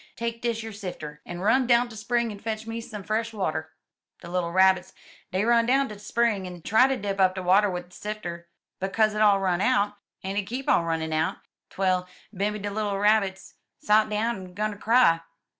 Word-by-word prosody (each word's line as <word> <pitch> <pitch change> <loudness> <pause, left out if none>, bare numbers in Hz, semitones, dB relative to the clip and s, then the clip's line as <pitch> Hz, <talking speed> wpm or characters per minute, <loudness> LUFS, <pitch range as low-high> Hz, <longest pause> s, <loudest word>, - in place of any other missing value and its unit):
Take 230 0 -4
dish 230 -2 -1
yer 225 - -6
sifter, 175 -7 -7
en 175 0 -6
run 230 +6 +3
down't 240 0 +3
de - - -10
spring 235 +2 -1
en 205 - -9
fetch 220 0 -4
me 225 0 -5
some 210 -3 -8
fresh 225 +3 -2
water/* 160 -6 -2 0.5
'*De 170 - -9
little 175 -2 -1
Rabbits, 190 0 +3 0.4
dey 190 +3 0
run 235 0 +4
down 270 +2 +3
t* - - -6
de 205 - -12
spring 210 -3 0
en 175 -2 -10
try 235 +5 +5
ter 270 -1 0
dip 200 -2 -3
up 185 -1 +4
de 185 - -4
water 195 +3 +4
wid 180 -1 -5
de - - -17
sifter, 175 -5 -6 0.3
but 190 0 -3
co*s 220 -1 +3
hit 210 0 -2
all 205 -2 +5
run 185 -2 0
out, 210 -2 +2 0.3
en 195 +1 -3
hit 200 -2 -1
keep 255 +3 -5
on 170 - +3
runnin' 160 -1 -2
out, 155 +1 0 0.3
twell 185 -1 0 0.3
bimeby 205 +1 -2
de 205 - -2
little 205 -1 -1
Rabbits 200 -2 +1 0.2
sot 215 +1 +3
down 220 +2 0
en 185 -1 -10
'gun 215 +1 -1
ter 205 - -9
cry. 225 -8 +4
205 Hz, 220 wpm, -26 LUFS, 185-225 Hz, 0.5 s, try